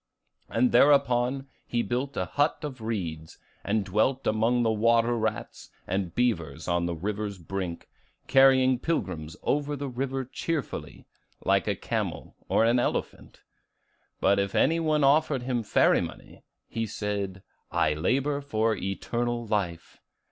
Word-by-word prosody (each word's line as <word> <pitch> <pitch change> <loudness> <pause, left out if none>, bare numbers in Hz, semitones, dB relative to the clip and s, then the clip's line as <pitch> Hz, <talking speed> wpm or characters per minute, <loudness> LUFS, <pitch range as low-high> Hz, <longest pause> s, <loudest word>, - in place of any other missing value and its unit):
And 255 -2 +2
thereupon 135 -2 +4 0.2
he 120 -1 0
built 130 +3 -3
a - - 0
hut 145 +2 +1
of 135 -5 -6
reeds, 85 -8 -4 0.3
and 105 0 0
dwelt 115 +8 +1
among 115 +3 +2
the 110 - +2
water 115 +2 +3
rats 110 -2 -3 0.2
and 95 -2 -2
beavers 85 - -1
on 85 -1 +1
the 85 - -2
river's 105 +3 -3
brink, 90 0 -5 0.4
carrying 130 -1 +5
pilgrims 80 - -3
over 145 0 0
the 140 0 -4
river 130 +1 -3
cheerfully, 150 +3 -4 0.4
like - - +2
a - - +1
camel - - -4
or 115 - +4
an 120 +2 +3
elephant. - - -3 0.8
But 100 - +3
if 100 0 -1
any 165 +4 +3
one 155 -2 +1
offered 140 -2 +3
him 125 -2 -1
ferry 110 - +3
money, - - -8 0.3
he 115 -1 -3
said, 100 -2 -3 0.3
'I 75 - +2
labor 135 - 0
for 110 -5 0
eternal 120 +5 -2
life! 90 -6 -3
115 Hz, 140 wpm, -27 LUFS, 100-135 Hz, 0.8 s, carrying